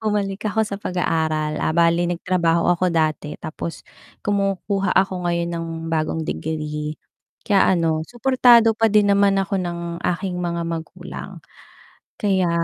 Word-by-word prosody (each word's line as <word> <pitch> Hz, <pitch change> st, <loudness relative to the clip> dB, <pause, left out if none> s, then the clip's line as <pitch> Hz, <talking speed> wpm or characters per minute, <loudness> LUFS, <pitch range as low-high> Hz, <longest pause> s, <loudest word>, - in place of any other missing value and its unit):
Bumalik 210 Hz, -1 st, -1 dB
ako 220 Hz, +1 st, +1 dB
sa 200 Hz, -1 st, -6 dB
pag-aaral, 155 Hz, -4 st, -1 dB
ah, 160 Hz, -, 0 dB
bale 170 Hz, +1 st, +3 dB
nagtrabaho 170 Hz, -1 st, +1 dB
ako 180 Hz, +1 st, +1 dB
dati 155 Hz, -2 st, -1 dB
tapos 165 Hz, +1 st, -7 dB, 0.4 s
kumukuha 195 Hz, 0 st, 0 dB
ako 185 Hz, -2 st, +1 dB
ngayon 170 Hz, 0 st, 0 dB
ng 165 Hz, 0 st, -3 dB, 0.3 s
bagong 160 Hz, 0 st, -1 dB
degree, 150 Hz, -1 st, -4 dB, 0.5 s
kaya 195 Hz, -2 st, +4 dB
ano 160 Hz, -2 st, +1 dB
suportado 240 Hz, -2 st, +5 dB
pa 225 Hz, 0 st, +2 dB
din 205 Hz, -1 st, +4 dB
naman 200 Hz, 0 st, +3 dB
ako 195 Hz, 0 st, 0 dB
ng 175 Hz, -1 st, -3 dB, 0.2 s
aking 180 Hz, 0 st, -2 dB
mga 170 Hz, -1 st, -2 dB
magulang, 165 Hz, -1 st, -7 dB, 0.8 s
kaya 190 Hz, -4 st, +1 dB
180 Hz, 135 wpm, -21 LUFS, 165-200 Hz, 0.8 s, suportado